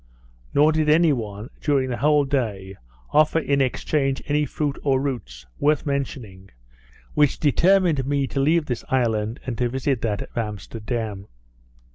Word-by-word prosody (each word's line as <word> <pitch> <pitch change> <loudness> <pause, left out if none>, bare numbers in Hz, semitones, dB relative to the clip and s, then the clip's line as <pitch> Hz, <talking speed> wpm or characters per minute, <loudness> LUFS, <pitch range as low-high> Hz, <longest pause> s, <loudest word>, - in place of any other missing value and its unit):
Nor 150 +2 +5
did 155 -1 +1
any 160 0 +5
one, 110 0 -6
during 140 -3 +1
the 120 - -2
whole 150 0 +3
day, 105 -9 -2 0.4
offer 155 +1 +4
in 140 -3 +1
exchange 135 +1 0
any 150 0 +1
fruit, 145 -2 -3
or 135 -2 +2
roots, 125 - -5
worth 150 +1 +2
mentioning, 120 -9 -4 0.6
which 145 -2 +2
determined 170 -2 +3
me 140 -1 +1
to 135 - -3
leave 155 +3 +2
this 125 -4 -4
island, 115 -3 0
and 120 -4 -4
to 120 -1 +1
visit 130 -1 -1
that 105 -3 -1
of - - -16
Amsterdam. 110 -1 -4
135 Hz, 150 wpm, -23 LUFS, 115-150 Hz, 0.6 s, Nor